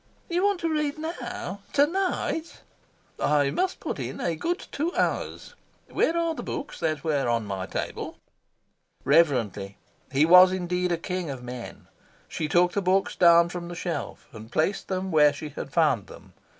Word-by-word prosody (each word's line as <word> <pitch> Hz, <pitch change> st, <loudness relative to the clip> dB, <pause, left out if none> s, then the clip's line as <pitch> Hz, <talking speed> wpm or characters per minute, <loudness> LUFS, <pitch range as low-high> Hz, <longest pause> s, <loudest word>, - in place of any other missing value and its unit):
"You 350 Hz, +2 st, 0 dB
want 405 Hz, -2 st, +2 dB
to 335 Hz, -, 0 dB
read 300 Hz, -2 st, -1 dB
NOW 250 Hz, -, -5 dB
TO 285 Hz, 0 st, +5 dB
NIGHT?" 340 Hz, -1 st, -2 dB, 0.6 s
"I 145 Hz, -1 st, +2 dB
must 370 Hz, 0 st, -1 dB
put -, -, -4 dB
in -, -, -5 dB
a 170 Hz, -2 st, -1 dB
good 345 Hz, -, -2 dB
two 320 Hz, +5 st, -1 dB
hours. -, -, -2 dB, 0.4 s
Where 330 Hz, -, +1 dB
are 335 Hz, -1 st, +1 dB
the -, -, -6 dB
books 290 Hz, -, -6 dB
that 155 Hz, -2 st, -1 dB
were 145 Hz, -6 st, 0 dB
on 115 Hz, -2 st, 0 dB
my 95 Hz, -2 st, -4 dB
table?" -, -, -5 dB, 0.9 s
Reverently 115 Hz, -, +2 dB, 0.3 s
he 140 Hz, +3 st, +4 dB
was 180 Hz, +2 st, +8 dB
indeed 180 Hz, -1 st, -1 dB
a 170 Hz, -, +1 dB
king 180 Hz, 0 st, -4 dB
of 130 Hz, -3 st, -6 dB
men 125 Hz, -1 st, -8 dB, 0.4 s
she 155 Hz, -, -3 dB
took 175 Hz, +3 st, +3 dB
the 200 Hz, -, -1 dB
books 190 Hz, +1 st, +1 dB
down 170 Hz, -1 st, +6 dB
from 175 Hz, -1 st, -6 dB
the 175 Hz, -, -7 dB
shelf, 170 Hz, -4 st, -5 dB
and 110 Hz, +1 st, -11 dB
placed 160 Hz, +6 st, 0 dB
them 190 Hz, 0 st, -2 dB
where 150 Hz, -2 st, +5 dB
she 150 Hz, +1 st, -7 dB
had 140 Hz, -1 st, -7 dB
found 140 Hz, -, +2 dB
them. -, -, -14 dB
175 Hz, 175 wpm, -26 LUFS, -, 0.9 s, was